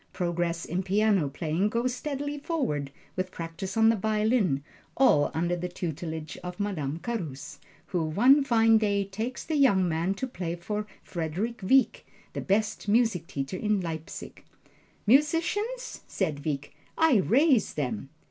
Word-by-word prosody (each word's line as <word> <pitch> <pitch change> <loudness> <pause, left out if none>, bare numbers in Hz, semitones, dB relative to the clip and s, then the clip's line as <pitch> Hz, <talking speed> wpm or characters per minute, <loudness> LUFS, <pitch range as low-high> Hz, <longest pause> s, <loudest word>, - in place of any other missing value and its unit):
Progress 175 -1 -1
in 180 +3 -1
piano 195 -4 +2
playing 160 +7 -1
goes 235 +3 0
steadily 290 +2 -4
forward, 265 - -2 0.3
with 185 0 -2
practise 180 +4 -6
on 225 0 +6
the 225 - +4
violin, 215 - +1 0.3
all 200 - +5
under 175 +2 +1
the 175 +1 -3
tutelage 160 -2 -5
of 180 +1 -6
Madame 160 -8 -2
Carus, 160 - -5 0.3
who 175 -4 -1
one 250 - +5
fine 225 -3 +4
day 200 -2 +1
takes 220 +6 -4
the 315 - -2
young 200 -10 +4
man 170 +4 0
to 260 - -3
play 175 -9 -4
for 210 +4 -4 0.2
Frederick 185 +8 -3
Wieck, 260 +8 +3 0.3
the - - -3
best 210 +2 0
music 210 -6 +2
teacher 135 +6 -4
in 210 0 +1
Leipzig. 165 -3 -6 0.6
"Musicians?" 330 - +1
said 155 -7 -2
Wieck, 145 -2 -3 0.2
"I 320 -7 +5
raise 255 - +3
them!" 130 -3 -3
195 Hz, 145 wpm, -28 LUFS, 165-235 Hz, 0.6 s, on